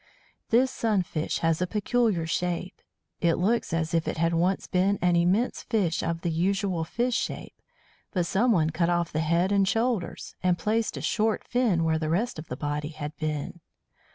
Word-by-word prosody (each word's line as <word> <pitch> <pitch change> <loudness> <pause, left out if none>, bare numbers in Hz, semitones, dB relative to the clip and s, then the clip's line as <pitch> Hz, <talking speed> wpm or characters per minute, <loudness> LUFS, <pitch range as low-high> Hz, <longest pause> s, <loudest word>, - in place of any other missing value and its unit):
This 255 +3 +4
Sunfish 185 -11 -1
has 165 +1 +2
a 180 - +1
peculiar 210 -3 +1
shape. 175 +2 -2 0.4
It 170 -2 +2
looks 225 +6 0
as 165 0 -1
if 165 -1 +1
it - - -2
had 165 +1 +1
once 180 +3 +1
been 190 +2 +1
an 180 -1 +2
immense 185 +8 +2
fish 200 -9 0
of 165 0 -2
the 170 - -1
usual 185 +1 0
fish 240 +10 -1
shape, - - -3 0.6
but 180 -4 0
someone 190 -5 +2
cut 170 +2 +1
off 175 -1 0
the 155 - 0
head 170 +4 +1
and 200 -1 +3
shoulders, 225 -3 -1
and 180 -1 +2
placed 220 +5 0
a - - -4
short 220 0 0
fin 230 -9 +1
where 160 -1 +1
the 155 -1 -2
rest 190 +3 0
of 155 - -8
the 125 - -5
body 145 +1 -3
had 150 -1 -6
been. 155 +2 -3
175 Hz, 180 wpm, -27 LUFS, 165-210 Hz, 0.6 s, This